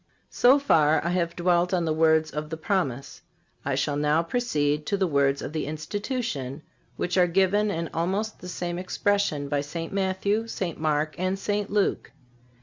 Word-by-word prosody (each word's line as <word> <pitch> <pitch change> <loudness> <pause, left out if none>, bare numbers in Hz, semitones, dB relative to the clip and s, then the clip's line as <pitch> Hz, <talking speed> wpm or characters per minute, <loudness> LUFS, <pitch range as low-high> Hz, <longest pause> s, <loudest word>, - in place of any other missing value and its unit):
So 255 +3 +5
far 160 - +3
I 170 - +1
have 170 -2 -1
dwelt 175 +1 +2
on 175 -2 0
the 160 - +1
words 160 0 +3
of 150 0 -4
the 160 - -4
Promise. 145 -7 -2 0.4
I - - -1
shall 145 - 0
now 150 +3 +2
proceed 150 -8 0
to 200 - +1
the 190 - +2
words 140 -3 +1
of - - -6
the 155 -3 -2
Institution, 160 - -4 0.3
which 180 +1 0
are 180 - +5
given 195 +4 +2
in 170 -4 -2
almost 195 +6 -1
the 180 - -8
same 175 -1 -3
expressions 185 -6 0
by 145 -1 +1
St. 165 +5 -6
Matthew, 200 +3 0
St. 185 -7 -4
Mark 155 0 0
and 185 +1 0
St. 205 +1 -2
Luke. 205 -7 0
170 Hz, 175 wpm, -26 LUFS, 150-195 Hz, 0.4 s, So